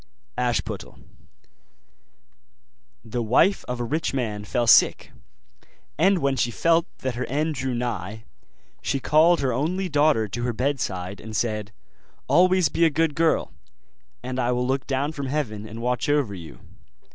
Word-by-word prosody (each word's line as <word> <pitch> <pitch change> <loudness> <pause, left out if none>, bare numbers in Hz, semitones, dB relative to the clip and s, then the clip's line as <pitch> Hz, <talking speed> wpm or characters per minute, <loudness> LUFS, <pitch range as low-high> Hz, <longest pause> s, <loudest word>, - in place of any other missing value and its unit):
ASHPUTTEL 120 -2 -2 2.1
The 120 +2 -3
wife 125 - +3
of 125 0 -4
a - - -1
rich 145 +4 -2
man 110 -5 -2
fell 120 +2 0
sick; 115 - +5 0.8
and 190 +5 +3
when 140 -4 0
she 120 - +1
felt 165 +7 +2 0.2
that 130 -1 -1
her 125 +1 -3
end 155 +3 -1
drew 130 -2 -3
nigh, 110 -3 -4 0.6
she 135 - -1
called 160 +5 +4
her 130 -3 0
only 180 +9 -1
daughter 145 -7 +3
to 110 +5 -5
her 120 0 -1
bed 135 +4 -1
side, 95 -1 -4
and 110 0 -8
said, 105 -3 -2 0.6
'Always 180 +4 +4
be 170 - 0
a 165 - +6
good 160 +1 +1
girl, 165 +1 +1 0.7
and 130 0 -4
I 125 0 +1
will 125 0 0
look 135 +1 -1
down 140 +2 -1
from 140 -3 -5
heaven 115 -7 -3
and 115 +1 -8
watch 125 +4 -1
over 145 -8 +1
you. 85 -4 -10
130 Hz, 155 wpm, -24 LUFS, 115-150 Hz, 2.1 s, a